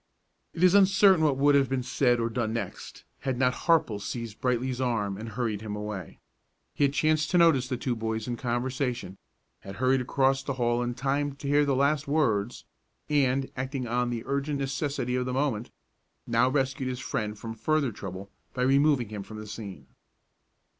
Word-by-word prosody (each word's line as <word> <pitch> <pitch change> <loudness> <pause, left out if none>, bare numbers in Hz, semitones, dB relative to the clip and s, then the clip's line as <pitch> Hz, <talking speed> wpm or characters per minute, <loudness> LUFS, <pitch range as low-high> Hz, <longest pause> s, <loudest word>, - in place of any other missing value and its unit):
It 170 - -1
is 185 0 +6
uncertain 190 -3 +5
what 145 -4 +2
would 145 +1 +4
have 140 -1 +3
been 130 -1 -1
said 125 -1 +2
or 115 - +1
done 115 -1 -2
next, 110 -5 -6 0.2
had 130 -2 -2
not 125 0 +2
Harple 125 -9 +1
seized 115 -1 -6
Brightly's 125 0 0
arm 110 -6 0
and 110 +3 -7
hurried 110 -2 -2
him 105 -1 -5
away. 105 -4 -6 0.6
He 145 - +2
had 140 - 0
chanced 155 0 +2
to 180 - +2
notice 160 -7 +4
the 130 -2 -2
two 125 0 -2
boys 110 0 -3
in 120 - -2
conversation, 120 -4 -2 0.4
had 95 0 -9
hurried 130 +3 +2
across 135 +1 +1
the 140 - -3
hall 120 -1 0
in 120 0 -2
time 140 +2 -1
to 140 - -7
hear 145 +1 +4
the 140 -2 +1
last 140 +2 +1
words, 120 -8 0 0.4
and, 135 -2 +1
acting 130 0 -3
on 120 +1 0
the 120 -2 -3
urgent 140 +2 -1
necessity 135 -2 -2
of 125 0 -1
the 125 - -2
moment, 130 -5 -1 0.6
now 120 +2 +3
rescued 130 -1 -1
his 125 -1 -4
friend 105 -4 -3
from 115 +1 -6
further 140 +4 0
trouble 95 -1 -8 0.2
by 125 - 0
removing 135 -3 +3
him 105 -2 -5
from 110 +2 -9
the 110 - -7
scene. 100 -8 -8
125 Hz, 190 wpm, -27 LUFS, 115-140 Hz, 0.6 s, is